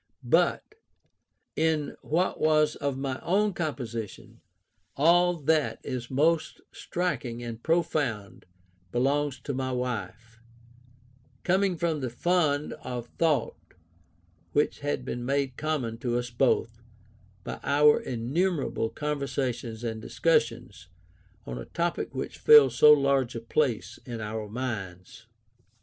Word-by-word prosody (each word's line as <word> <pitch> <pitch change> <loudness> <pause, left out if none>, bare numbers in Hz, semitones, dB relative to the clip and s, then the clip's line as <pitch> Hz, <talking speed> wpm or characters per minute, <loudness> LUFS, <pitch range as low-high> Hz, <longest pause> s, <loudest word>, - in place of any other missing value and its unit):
But] - - +3 0.9
in 155 -2 0
what 170 +5 0
was 155 -1 +3
of 140 -2 -2
my 135 -1 -3
own 205 +3 +1
composition, 120 - -5 0.6
all 175 +4 +4
that 155 -1 +1
is 125 -2 -5
most 155 +4 +1
striking 130 -10 -3
and 115 -1 -6
profound 150 - -1 0.5
belongs 135 +2 0
to 140 - -4
my 130 0 -2
wife; 120 -2 -4 1.0
coming 190 0 +2
from 165 -2 0
the 130 -3 -3
fund 150 +2 +1
of 120 -2 -6
thought 150 -8 0 0.8
which 145 - +1
had 145 -3 -2
been 120 -2 -4
made 135 0 -1
common 130 -8 -2
to 120 0 -1
us 120 0 -3
both, 115 -2 +1 0.6
by - - -6
our 150 +1 +5
innumerable 135 +1 -1
conversations 135 -6 -3
and 110 -2 -3
discussions 115 - 0 0.6
on 60 -1 -5
a - - -7
topic 170 0 -2
which - - -5
filled 450 -1 +7
so 150 - +7
large 140 -4 +3
a - - -2
place 115 -4 -1
in 120 -2 -6
our 105 0 -5
minds. 110 -3 -6
135 Hz, 120 wpm, -27 LUFS, 115-155 Hz, 1.0 s, filled